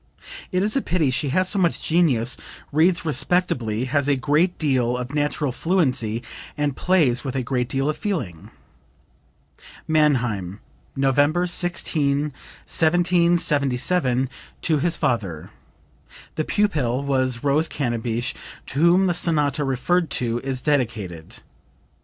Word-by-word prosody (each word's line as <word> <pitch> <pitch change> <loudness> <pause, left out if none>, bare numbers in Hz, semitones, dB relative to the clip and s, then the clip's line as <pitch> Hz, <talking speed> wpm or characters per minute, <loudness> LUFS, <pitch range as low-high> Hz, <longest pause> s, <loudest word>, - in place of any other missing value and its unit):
It 185 0 +1
is 215 +4 +2
a 275 - +2
pity; 165 - 0
she 135 +2 -1
has 185 +6 +1
so 200 - +1
much 175 -3 +1
genius, 140 -8 +2 0.4
reads 165 +4 +2
respectably, 135 -6 0
has 140 +2 0
a 145 - +3
great 150 +7 +1
deal 125 -5 0
of 125 +2 -6
natural 145 -1 -1
fluency 125 - 0 0.3
and 145 -2 -1
plays 155 -10 +2
with 135 -2 -4
a 130 - -1
great 125 0 -2
deal 135 +1 -1
of 155 - 0
feeling." 125 - -4 1.4
(Mannheim, 120 - +1 0.4
November 145 +5 +2
16, 150 -5 0 0.3
1777, 165 -5 +2 0.4
to 155 -3 +1
his 170 +3 0
father. 100 -11 -2 0.8
The 155 - -2
pupil 140 - 0
was 130 -3 0
Rose 145 +3 +2
Cannabich, 120 -3 -2 0.3
to 135 - -4
whom 175 +4 +4
the 180 - +1
sonata 150 -4 +1
referred 150 +6 0
to 120 -3 -1
is 130 -1 -3
dedicated. 110 - -2
145 Hz, 125 wpm, -22 LUFS, 125-170 Hz, 1.4 s, whom